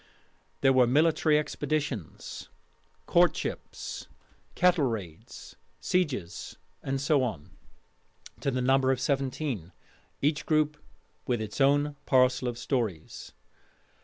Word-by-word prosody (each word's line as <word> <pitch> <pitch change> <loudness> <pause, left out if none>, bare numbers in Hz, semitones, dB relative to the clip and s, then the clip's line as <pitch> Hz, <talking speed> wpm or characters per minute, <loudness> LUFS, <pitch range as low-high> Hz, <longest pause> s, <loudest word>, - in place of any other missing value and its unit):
There 135 -1 +5
were 130 -2 +5
'Military 155 +3 +3
Expeditions,' 145 - -3 0.6
'Courtships,' - - 0 0.5
'Cattle 180 -4 +4
raids,' 100 -10 -6 0.2
'Sieges,' 140 - -2 0.2
and 135 0 -2
so 140 +1 +2
on, 100 - -4 0.9
to - - -1
the 130 -1 -1
number 135 0 +3
of 130 - 0
seventeen, 135 - -2 0.5
each 150 +1 0
group 155 -1 +2 0.5
with 120 -2 +1
its 110 +5 -4
own 145 +1 +3
parcel 130 -1 +3
of 120 -1 -3
stories. 115 - -3
135 Hz, 105 wpm, -28 LUFS, 120-150 Hz, 0.9 s, There